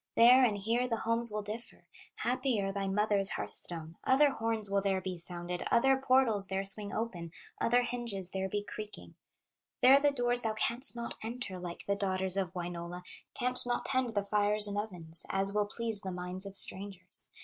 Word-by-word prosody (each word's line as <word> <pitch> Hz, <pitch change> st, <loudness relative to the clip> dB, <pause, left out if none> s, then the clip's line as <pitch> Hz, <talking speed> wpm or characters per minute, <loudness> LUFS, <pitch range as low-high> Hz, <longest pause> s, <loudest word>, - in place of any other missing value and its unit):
There 250 Hz, +3 st, +6 dB
and 215 Hz, -5 st, +2 dB
here 230 Hz, +5 st, -1 dB
the 230 Hz, -2 st, -2 dB
homes 230 Hz, +1 st, +4 dB
will 210 Hz, 0 st, -4 dB
differ, 215 Hz, +3 st, -4 dB, 0.3 s
Happier 245 Hz, -5 st, -1 dB
thy 195 Hz, 0 st, -4 dB
mother's 200 Hz, 0 st, +2 dB
hearth -, -, -5 dB
stone; 165 Hz, -1 st, -6 dB
Other 280 Hz, +2 st, +3 dB
horns 225 Hz, -4 st, -1 dB
will 200 Hz, 0 st, 0 dB
there 195 Hz, -1 st, 0 dB
be 185 Hz, 0 st, -5 dB
sounded, 175 Hz, 0 st, -6 dB
Other 270 Hz, +3 st, +3 dB
portals 255 Hz, -6 st, +4 dB
there 195 Hz, +1 st, -2 dB
swing 200 Hz, +1 st, 0 dB
open, 185 Hz, -7 st, -5 dB, 0.3 s
Other 245 Hz, +1 st, +2 dB
hinges 235 Hz, -7 st, -3 dB
there 190 Hz, 0 st, -3 dB
be 205 Hz, +1 st, -3 dB
creaking; 210 Hz, +1 st, -9 dB, 0.7 s
There 265 Hz, +2 st, +7 dB
the 290 Hz, 0 st, +3 dB
doors 245 Hz, -3 st, +1 dB
thou 220 Hz, -2 st, -2 dB
canst 240 Hz, +4 st, +2 dB
not 235 Hz, 0 st, -6 dB
enter 225 Hz, -4 st, -5 dB
Like 175 Hz, -1 st, -8 dB
the 200 Hz, -, 0 dB
daughters 190 Hz, -2 st, -1 dB
of 190 Hz, -2 st, -3 dB
Wainola, 175 Hz, 0 st, -6 dB, 0.3 s
Canst 250 Hz, 0 st, +1 dB
not 245 Hz, -, -2 dB
tend 255 Hz, -4 st, -1 dB
the 205 Hz, -, 0 dB
fires 210 Hz, +1 st, +4 dB
and 205 Hz, -, -4 dB
ovens 175 Hz, -6 st, 0 dB
As 195 Hz, +1 st, +1 dB
will 210 Hz, 0 st, 0 dB
please 225 Hz, -1 st, +4 dB
the 190 Hz, -, -6 dB
minds 180 Hz, +2 st, -4 dB
of 195 Hz, -, -10 dB
strangers. 190 Hz, -2 st, -1 dB
205 Hz, 185 wpm, -31 LUFS, 190-235 Hz, 0.7 s, There